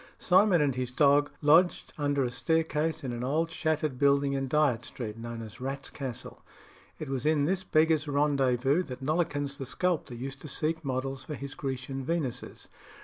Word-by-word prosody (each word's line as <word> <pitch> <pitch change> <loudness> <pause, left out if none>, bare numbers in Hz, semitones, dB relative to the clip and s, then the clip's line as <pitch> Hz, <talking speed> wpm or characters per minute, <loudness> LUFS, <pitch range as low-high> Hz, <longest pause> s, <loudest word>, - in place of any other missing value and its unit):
Simon 185 -2 +4
and 140 -2 +1
his 125 0 -2
dog 145 +2 +4
lodged 165 +5 +4
under 145 -2 0
a 125 - -1
staircase 160 +5 0
in 125 -2 -3
an 120 +1 -4
old 160 +6 0
shattered 155 -4 -1
building 140 0 +3
in 135 -1 -1
Dyot 140 -5 +2
Street, 110 -4 -6
known 115 0 -6
as 110 +2 -11
"Rat's 135 +1 -5
Castle." 130 -4 -6 0.6
It 155 - -6
was 135 -2 -2
in 150 -2 +2
this 190 +3 0
beggars' 155 -2 +2
rendezvous 140 0 +2
that 130 -6 -7
Nollekens 145 -2 -1
the 135 - -4
sculptor 175 -5 -1
used 135 +3 -7
to - - -8
seek 160 +3 -1
models 135 0 -3
for 150 - -6
his 140 +1 -7
Grecian 135 -1 -4
Venuses. 140 -5 -3
140 Hz, 175 wpm, -29 LUFS, 130-155 Hz, 0.6 s, Simon